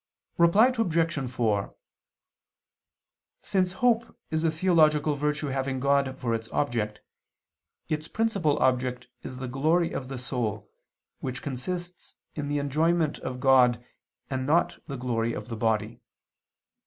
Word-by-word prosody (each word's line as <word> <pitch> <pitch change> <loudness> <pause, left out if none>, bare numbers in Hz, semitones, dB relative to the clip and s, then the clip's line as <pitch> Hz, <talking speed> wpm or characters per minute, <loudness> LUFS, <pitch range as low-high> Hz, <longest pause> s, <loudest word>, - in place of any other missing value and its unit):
Reply 205 +10 +6
Obj. 165 - 0
4: 110 -5 0 1.7
Since 185 -2 +1
hope 235 +2 +1
is 160 0 0
a 165 - +3
theological 155 -3 +3
virtue 150 0 -1
having 135 0 -2
God 140 -1 +1
for 120 -3 -1
its 115 0 -3
object, 115 -7 -1 0.9
its 155 0 -2
principal 200 -10 +1
object 125 -1 0
is 130 - -7
the 130 0 -5
glory 155 +7 +1
of 130 - -4
the 135 0 -5
soul, 120 -5 -3 0.5
which 130 -1 -5
consists 175 +6 -5 0.2
in 150 -2 -4
the 145 0 -1
enjoyment 155 +3 +1
of 125 -1 -5
God, 125 -2 +4 0.4
and 130 -1 -3
not 165 +4 +2
the 140 -3 -5
glory 115 -2 -1
of - - -6
the 115 - -4
body. 110 0 -1
140 Hz, 130 wpm, -27 LUFS, 125-165 Hz, 1.7 s, Reply